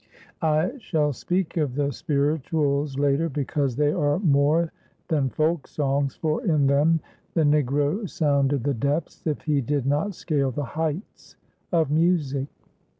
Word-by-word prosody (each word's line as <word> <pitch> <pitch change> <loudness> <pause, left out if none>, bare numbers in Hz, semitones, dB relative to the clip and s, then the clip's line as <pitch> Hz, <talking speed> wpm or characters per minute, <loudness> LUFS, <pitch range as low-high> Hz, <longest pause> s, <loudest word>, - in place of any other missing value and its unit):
I 160 - +1
shall 155 -9 0
speak 180 +6 -2
of 145 -6 0
the 145 0 0
"spirituals" 145 -1 0
later 145 +3 +2
because 140 -2 -1
they 145 +2 +2
are 145 0 +1
more 160 -1 +2 0.4
than 145 -5 +1
folk 155 +2 0
songs, 140 -1 -1
for 160 +9 -1
in 155 - +2
them 150 +4 +3 0.3
the 165 - +3
Negro 145 - +1
sounded 140 -6 +1
the 145 - +1
depths, 140 +6 -2
if 150 - -2
he 150 -3 +1
did 140 +1 -1
not 150 +8 0
scale 145 -6 0
the 140 +3 -3
heights, 160 - -5 0.4
of 160 -5 +2
music. 150 -4 +1
150 Hz, 145 wpm, -25 LUFS, 140-160 Hz, 0.4 s, them